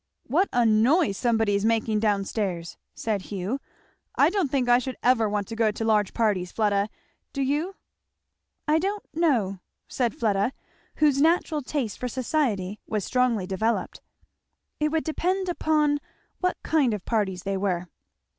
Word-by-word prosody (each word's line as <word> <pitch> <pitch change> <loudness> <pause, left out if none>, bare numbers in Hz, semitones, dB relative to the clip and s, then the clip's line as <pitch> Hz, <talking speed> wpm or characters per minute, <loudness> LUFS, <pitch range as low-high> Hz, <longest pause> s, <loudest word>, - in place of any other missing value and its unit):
"What 345 +10 +2
a 245 -2 +3
noise 225 - +4
somebody 225 -2 +1
is 200 0 +1
making 220 -1 +1
down 205 -2 +1
stairs!" 180 -6 -3 0.2
said 215 -3 -1
Hugh. 205 +6 -2 0.6
"I - - +4
don't 380 -8 0
think 260 -2 0
I 245 0 +6
should 255 +1 -5
ever 235 -3 +3
want 205 -1 -1
to 225 - -5
go 225 -1 +3
to 220 +2 -3
large 210 -3 +2
parties, 200 -6 +1
Fleda, 205 -1 +1 0.4
do 275 - -1
you?" 300 +8 -1 0.9
"I 305 +1 +4
don't 400 +4 -2
know," 245 - +1 0.3
said 240 -4 -1
Fleda, 210 +2 +1 0.4
whose 290 -3 +3
natural 320 -1 +2
taste 255 -6 -3
for 250 - -2
society 230 -6 -1
was 210 -3 -2
strongly 250 -6 +1
developed; 220 +5 -1 0.8
"it 305 0 +2
would 320 0 0
depend 370 +4 -1
upon 305 -4 +1 0.4
what 365 0 0
kind 275 -8 +2
of 205 - -9
parties 195 -6 -1
they 195 0 -1
were." 185 -2 -1
230 Hz, 155 wpm, -26 LUFS, 205-295 Hz, 0.9 s, I